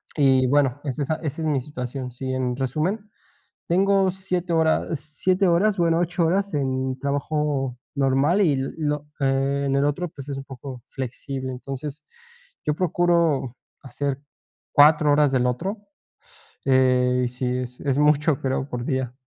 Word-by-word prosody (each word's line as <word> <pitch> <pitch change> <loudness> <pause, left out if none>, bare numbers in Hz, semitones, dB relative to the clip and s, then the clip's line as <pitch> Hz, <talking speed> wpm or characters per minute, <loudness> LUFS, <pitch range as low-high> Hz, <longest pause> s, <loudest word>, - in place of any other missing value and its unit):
Y 130 -3 +4
bueno, 140 0 +2
es 140 0 -4
esa 150 +2 0
esa 155 0 -5
es 160 - -1
mi 145 -3 +1
situación, 125 -2 -6
sí, 130 +1 -4
en 125 -1 -1
resumen, 160 - -2 0.6
tengo 195 +1 +3
7 185 -2 -3
horas, 160 -1 +1
7 185 +6 0
horas, 195 +4 +3
bueno, 170 -1 +2
8 175 0 +1
horas 195 +2 0
en 130 -2 -1
trabajo 140 -2 -1 0.2
normal 140 +7 +2
y 160 -7 +4
l 135 0 -1
lo, 150 -1 -2
eh, 135 0 +1
en 135 - +1
el 140 +1 +2
otro, 145 +5 -1
pues, 145 -3 -10
es 140 - -3
un 135 - -6
poco 130 -2 -9
flexible, 130 +1 -5
entonces, 135 +3 -6 0.6
yo 150 - +2
procuro 170 -7 +1 0.3
hacer 135 +1 -3 0.5
4 150 0 +6
horas 145 -1 +4
del 125 -2 +2
otro, 195 - -3 0.8
eh, 125 -1 +3
y - - -1
sí, 125 +1 -4
es 125 0 -6
es 140 -1 0
mucho, 150 0 +3
creo, 135 +1 -1
por 120 -1 -4
día. 130 -3 -2
140 Hz, 160 wpm, -24 LUFS, 130-160 Hz, 0.8 s, 4